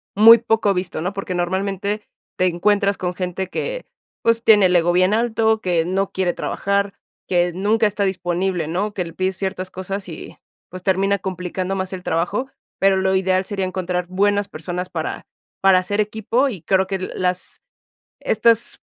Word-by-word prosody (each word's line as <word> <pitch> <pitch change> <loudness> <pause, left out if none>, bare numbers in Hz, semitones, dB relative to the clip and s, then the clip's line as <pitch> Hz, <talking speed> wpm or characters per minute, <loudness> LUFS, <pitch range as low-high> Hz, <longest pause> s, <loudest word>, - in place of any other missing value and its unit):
muy 225 +3 +9
poco 220 -3 +1
visto, 180 -3 -3
¿no? 180 +4 -2
Porque 195 -2 -4
normalmente 195 +3 -2 0.3
te 185 - +2
encuentras 200 +3 +2
con 180 -1 -2
gente 180 0 -3
que, - - -4 0.4
pues 230 0 +2
tiene 205 -3 +7
el 180 - +1
ego 175 +1 +2
bien 185 +3 +3
alto, 220 -1 +2
que 175 -4 +1
no 190 +2 -1
quiere 185 -2 0
trabajar, 200 0 -1 0.3
que 175 -1 +2
nunca 215 +4 +2
está 205 0 -1
disponible, 180 -2 -1
¿no? 200 +5 -2
Que 185 - -2
le 165 - -8
pides 185 0 -1
ciertas 190 -1 -3
cosas 190 +1 -5
y, 165 - -9 0.3
pues, 185 0 -8
termina 195 +1 +1
complicando 185 0 -3
más 190 -1 -3
el 185 -1 -6
trabajo, 180 +11 -1 0.3
pero 195 0 +4
lo 190 0 +1
ideal 190 0 +2
sería 195 -1 -2
encontrar 180 -1 -2
buenas 205 +2 +1
personas 175 +3 -4
para - - -4 0.3
para 195 -1 +5
hacer 205 +3 -3
equipo, 220 +5 +1
y 190 -9 -7
creo 190 +2 +1
que 195 - -2
l 185 - -4
las 180 0 -2 0.6
estas 230 +1 +2
190 Hz, 175 wpm, -21 LUFS, 180-205 Hz, 0.6 s, muy